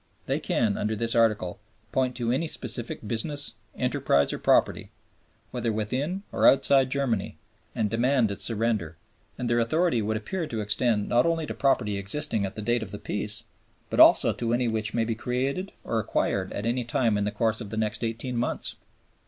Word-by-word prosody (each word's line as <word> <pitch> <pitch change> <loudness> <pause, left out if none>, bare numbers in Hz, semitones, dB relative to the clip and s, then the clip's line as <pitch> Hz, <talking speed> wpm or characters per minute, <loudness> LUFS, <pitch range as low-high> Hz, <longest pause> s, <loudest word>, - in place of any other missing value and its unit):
They - - 0
can, 105 -4 0
under 110 +1 -1
this 115 +2 0
Article, 110 -6 +1 0.3
point 130 -1 0
to 120 -2 -1
any 140 +7 0
specific 120 -7 -4
business, 145 +5 -1 0.2
enterprise, 125 - +1
or - - -4
property, - - +2 0.6
whether 120 -2 -1
within 130 - -2
or - - +3
outside 135 -1 +5
Germany, 130 -7 -1 0.4
and 110 - +1
demand 120 0 +2
its 100 - -4
surrender; 110 -8 -1 0.4
and 125 - -3
their 120 0 +2
authority 155 +2 +2
would 110 +1 -1
appear 160 - -4
to 115 - -4
extend 105 0 +1
not 120 +5 +3
only 165 -1 0
to - - -5
property 105 -7 +1
existing 105 +1 -1
at 95 - -10
the 110 - -5
date 120 +2 +1
of 110 - -5
the 105 - -6
Peace, 105 +1 -2 0.5
but - - -1
also - - +7
to 115 -1 -2
any 120 0 +1
which 110 -1 +1
may 115 -1 +1
be 115 - -1
created 130 - -2
or 115 - -1
acquired 100 -3 -1
at 100 - -4
any 120 +2 0
time 115 -2 +1
in 105 - 0
the 105 - 0
course 110 +2 0
of 105 - -7
the 110 - -5
next 110 +1 -2
eighteen 115 +2 -3
months. 120 - -1
115 Hz, 190 wpm, -26 LUFS, 105-130 Hz, 0.6 s, also